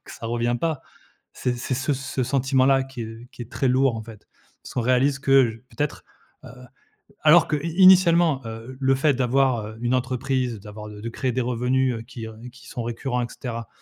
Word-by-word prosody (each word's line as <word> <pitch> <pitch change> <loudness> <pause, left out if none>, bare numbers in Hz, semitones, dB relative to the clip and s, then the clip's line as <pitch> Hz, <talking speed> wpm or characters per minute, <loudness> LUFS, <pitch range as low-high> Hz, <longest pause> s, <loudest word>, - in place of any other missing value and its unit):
que - - -11
ça 115 - -7
revient 120 +1 0
pas. 160 -4 -1 0.5
C'est 125 - -2
c'est 125 +2 -3
ce 135 +3 -1
s 135 - -2 0.2
ce 130 - 0
sentiment-là 135 +1 +2
qui, 130 -3 -7
heu, 115 0 -8
qui - - -8
est 120 - -11
très 135 - 0
lourd 130 0 +3
en 110 - -5
fait. 110 -2 -13 0.4
Parce - - -10
qu'on 125 - 0
réalise 130 +3 +2
que 135 -3 +4
j 115 - -13
peut-être, 150 -1 -3 0.4
heu, - - -9 0.8
alors 155 +2 +6
que 150 - 0
i 155 +4 -4
initialement, 175 -6 +6
heu, 115 +3 -8
le 135 -1 +3
fait 145 +2 +2
d'avoir, 130 -3 +1
heu, 110 +1 -10
une 120 +1 +1
entreprise, 130 -2 -1
d'avoir 105 +1 -9
de 105 -1 -10
de 115 - -4
créer 125 +2 -2
des 130 - -1
revenus, 125 +1 0
heu, 115 - -6
qui, 115 -2 -8
heu, 110 - -10 0.2
qui 125 -1 -16
sont 120 - -5
récurrents 120 +2 -2
et 120 - -3
cetera. 115 -3 -6
125 Hz, 215 wpm, -24 LUFS, 115-135 Hz, 0.8 s, alors